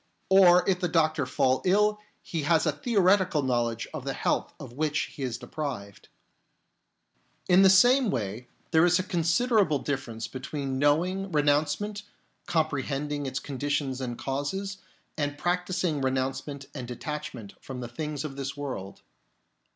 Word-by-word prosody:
Or 180 -2 +6
if 185 -2 +2
the 180 - 0
doctor 155 -4 +1
fall 130 0 +1
ill, 210 +3 +3 0.2
he 165 -3 -3
has 160 +2 +2
a 155 - +3
theoretical 185 - +2
knowledge 120 -3 0
of - - -5
the - - -3
health - - 0
of 120 - -9
which 150 +2 0
he 145 - -10
is 125 -3 -2
deprived. 125 -10 -6 1.4
In 180 +1 +6
the 195 - +7
same 245 +6 +6
way 115 - -3 0.2
there 160 -1 +5
is 175 0 +5
a 185 - 0
considerable 175 - +2
differ 135 -2 -3
ence 115 0 -5
between 135 0 -4
knowing 180 +7 +1
renouncement, 150 +8 +1 0.5
compre 155 -4 +1
hending 145 +1 -3
its 130 - -3
conditions 140 -1 -2
and 120 -2 -4
causes, 190 +9 -3 0.4
and 145 0 -1
practising 180 -3 -1
renouncement 135 +1 -2
and 130 -4 -6
detachment 125 -4 -6
from 130 -2 -7
the 120 - -5
things 150 +4 -4
of 140 -3 -6
this 135 0 -4
world. 130 -9 -6
150 Hz, 150 wpm, -27 LUFS, 135-180 Hz, 1.4 s, the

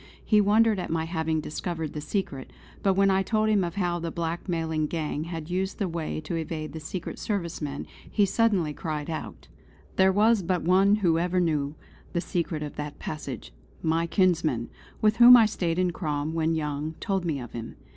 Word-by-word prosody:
He 210 -2 +5
wondered 215 +1 +4
at - - -4
my 160 0 0
having 160 -1 -1
discovered 160 0 -4
the 150 - -4
secret; 150 -7 -3 0.3
but 195 -1 +2
when 195 0 +4
I 190 0 +3
told 215 +2 +1
him 205 -3 +3
of 170 -1 -3
how 175 -3 0
the 165 0 -3
blackmailing 165 -2 -2
gang 155 -1 -3
had 165 -1 -6
used 190 +2 -1
the 200 - -1
way 165 -2 -3
to 155 +2 -4
evade 160 -1 -4
the 160 - -5
Secret 175 +3 -6
Service 180 -7 -3
men, 140 -2 -4 0.2
he 205 - +3
suddenly 195 -6 +2
cried 155 0 -4
out: 160 - -6 0.5
"There 190 0 +5
was 215 +2 +4
but 180 -1 -1
one 190 +4 +5
who 165 -1 +4
ever 180 +1 +1
knew 150 -4 0 0.4
the 175 - +1
secret 170 -4 -2
of 150 - -7
that 150 0 -5
passage; 150 - -6 0.3
my 165 +1 +1
kinsman, 165 - +1 0.3
with 215 +1 +4
whom 245 +1 +10
I 230 - +6
stayed 175 -6 -1
in 180 -1 +2
Crom 155 -2 -2
when 165 0 +1
young, 150 0 -2
told 195 -3 -1
me 160 -5 -1
of 120 -2 -8
him. 115 -1 -7
170 Hz, 195 wpm, -27 LUFS, 155-190 Hz, 0.5 s, whom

